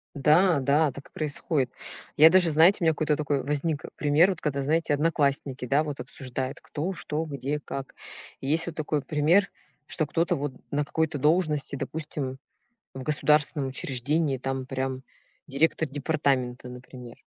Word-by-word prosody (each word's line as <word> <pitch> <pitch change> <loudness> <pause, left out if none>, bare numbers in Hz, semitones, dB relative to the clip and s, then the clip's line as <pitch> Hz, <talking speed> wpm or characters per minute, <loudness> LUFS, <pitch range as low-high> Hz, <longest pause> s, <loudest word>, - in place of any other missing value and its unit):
Да, 155 +3 +4
да 145 +3 +2
так 140 +2 -12
и - - -44
происходит. 145 -3 -1 0.4
Я 155 +2 +8
даже 180 -1 +4
знаете 165 +6 +5
у - - 0
меня 160 - +5
какой-то 150 0 0
такой 145 -2 -1
возник, 145 +1 -1
э, - - -8
пример, 150 +5 +4
вот 180 - -6
когда 140 -2 -1
знаете, 155 +2 +1
одноклассники, 140 -4 0
да, 140 +5 +2
вот 145 -2 -5
обсуждают 130 +1 -5
кто, 165 +6 -4
что, 155 -2 -3
где, 140 0 -3
как? 135 -2 -7 0.5
И 135 - -5
есть 165 +4 +3
вот 170 - -5
такой 150 -1 -1
пример, 160 +8 +2 0.4
что 155 - -2
кто-то 165 +3 +1
вот 140 -1 -3 0.2
на 145 +1 +1
какой-то 160 0 -1
должности, 150 -1 +1
допустим, 145 -3 -4 0.6
в 130 - -6
государственном 150 0 +2
учреждении, 135 +2 -1
там 135 0 -3
прям 130 0 -3 0.4
директор 160 +2 +1
департамента, 135 -4 -1
например. 125 -1 -11
145 Hz, 160 wpm, -26 LUFS, 135-155 Hz, 0.6 s, Я